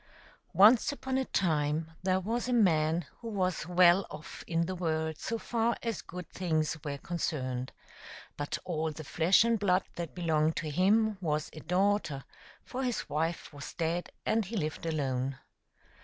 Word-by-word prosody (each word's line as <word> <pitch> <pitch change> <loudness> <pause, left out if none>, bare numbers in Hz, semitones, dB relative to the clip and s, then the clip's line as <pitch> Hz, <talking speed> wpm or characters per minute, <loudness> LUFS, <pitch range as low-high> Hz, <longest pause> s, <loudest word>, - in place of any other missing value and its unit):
NCE 225 +7 +7
upon 265 -2 -2
a 265 - 0
time 155 -4 0
there 185 0 +2
was 230 +6 -2
a 250 - 0
man 165 -7 +3
who 235 - -8
was 185 -6 -1
well 180 +1 +5
off 155 - -9
in 165 0 +1
the 185 - -3
world 160 -3 -1
so 230 - -2
far 230 0 0
as 230 -4 -2
good 180 0 -8
things 160 -4 0
were 140 -1 -3
concerned; 130 -6 -3 0.6
but 145 0 -3
all 160 -2 -1
the 155 +1 -8
flesh 170 +7 +4
and 230 -1 +2
blood 185 -2 +3
that 170 -2 -5
belonged 160 -2 +1
to 155 -2 -3
him 205 +5 +3
was 150 -3 -1
a 155 - -8
daughter, 180 -5 +1 0.4
for 255 - -5
his 250 -3 -1
wife 160 0 -2
was 145 0 -8
dead, 170 +1 -1 0.2
and 225 -1 +2
he 220 +4 -4
lived 155 -1 -3
alone. 135 -4 -1
170 Hz, 165 wpm, -31 LUFS, 155-200 Hz, 0.6 s, NCE